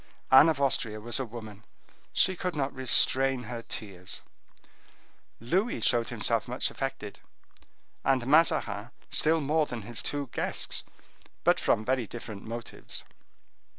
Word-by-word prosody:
Anne 135 +5 +9
of 155 -3 0
Austria 125 -6 +1
was 120 +4 -2
a 130 - -1
woman; 110 -3 -9 0.5
she 185 - +3
could 180 -1 -3
not 140 -2 -1
restrain 130 0 +2
her 115 +1 -6
tears. 95 -5 -5 1.2
Louis 185 - 0
showed 120 -1 +2
himself 115 -1 +1
much 125 +1 0
affected, 135 -6 -5 0.8
and 130 -2 +2
Mazarin 135 -8 +3 0.2
still 160 +1 +3
more 155 +1 +1
than 120 -3 -6
his 115 +2 -2
two 145 -3 -3
guests, - - -1 0.6
but - - +4
from 110 - +1
very 130 -2 0
different 110 -3 -8
motives. 115 +1 -6
125 Hz, 130 wpm, -29 LUFS, 110-140 Hz, 1.2 s, Anne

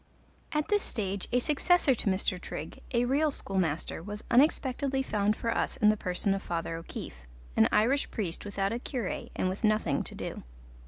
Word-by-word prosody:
At 300 0 -1
this 415 -1 +3
stage 200 - -2
a 245 - +3
successor 300 +3 +4
to 220 - -1
Mr. 190 -1 0
Trigg, 155 - -7
a 240 -1 +2
real 285 +5 +2
schoolmaster, 185 - -2
was 205 +4 -7
unexpectedly 270 0 +3
found 210 -3 +1
for 230 +1 -1
us - - 0
in 210 - +5
the 215 - +4
person 190 0 0
of 195 - -2
Father 165 -2 -3
O'Keefe, 65 - -8 0.3
an 110 - +5
Irish 245 +7 +3
priest 185 -7 -3
without 200 0 -1
a 235 - -2
cure 245 -5 -3 0.2
and - - 0
with 185 +5 -3
nothing 215 -10 +2
to - - -3
do. - - -5
210 Hz, 180 wpm, -30 LUFS, 185-260 Hz, 0.3 s, in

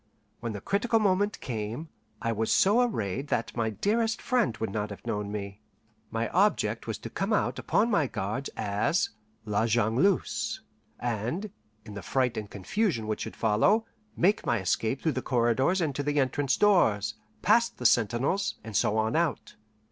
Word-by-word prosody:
When 115 -2 -4
the 100 - -6
critical 215 - +1
moment 205 -1 +1
came, 115 +6 -4 0.3
I 115 - +1
was 110 0 -1
so 210 +6 +4
arrayed 135 - -1
that 115 - -2
my 115 -2 0
dearest 220 - 0
friend 245 - +1
would 110 - -3
not 105 0 -2
have 100 - -10
known 105 -1 -2
me. 100 0 -6 0.5
My 115 +1 -1
object 200 +4 +1
was - - -2
to - - -8
come - - -2
out - - +1
upon 235 - +1
my 160 -9 +3
guards 110 +6 -3
as 105 - 0 0.3
La 105 +2 +1
Jongleuse, 120 - +1 0.4
and, 120 - -2 0.3
in 105 - -9
the 100 - -6
fright 130 +1 0
and 105 -2 -5
confusion 115 - -1
which 110 0 -3
should - - -5
follow, 115 - +3 0.3
make 200 +4 +3
my 120 -2 +1
escape 110 +7 -1
through 160 - +2
the 130 -2 -3
corridors 130 +10 +2
and 155 -4 0
to 145 - -1
the 145 +1 0
entrance 135 0 +1
doors, 110 - +3 0.3
past 235 +4 +3
the - - -7
sentinels, 130 - +2
and 110 -2 -8
so 105 +2 +2
on 110 +1 +1
out. 165 -2 0
120 Hz, 170 wpm, -28 LUFS, -, 0.5 s, so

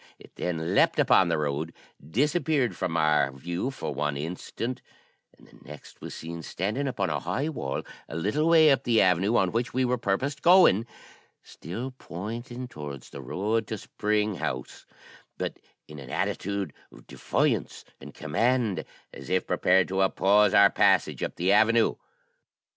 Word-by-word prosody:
It - - -17
then 80 -2 -2
leaped - - +3
upon - - +4
the - - +1
road, 75 +2 -2 0.3
disappeared 140 - 0
from 85 -2 -2
our 75 -3 +3
view 85 - -4
for 130 - -5
one 75 +1 -2
instant, 90 - -5 0.6
and - - -20
the - - -20
next 75 0 -13
was - - -7
seen 85 +1 -7
standing 105 - -3
upon 100 -9 -1
a 75 - -1
high 95 - -2
wall 70 - -4 0.3
a - - -7
little 105 - 0
way 160 -2 +7
up 135 -1 +3
the 115 -3 +3
avenue 95 +5 +3
on 95 -2 +2
which 120 +3 -2
we 130 0 +2
purposed 130 +7 -2
going, 170 - +6 0.6
still 115 - -7
pointing 120 +7 -6
towards 75 - -9
the 70 - -8
road 105 - -1
to 110 - -4
Spring 105 0 -1
House, 65 -5 -5 0.5
but - - -4 0.3
in 75 -1 -10
an 65 -2 -10
attitude 100 +7 -2 0.2
of - - -16
defiance - - -1
and - - -12
command, 115 +6 0 0.3
as 70 - -10
if 95 0 +1
prepared 95 0 +3
to 95 +1 0
oppose 100 +2 +4
our 100 -1 +7
passage - - +2
up - - -3
the 90 +3 +1
avenue. 110 +2 +4
100 Hz, 160 wpm, -27 LUFS, 80-120 Hz, 0.6 s, way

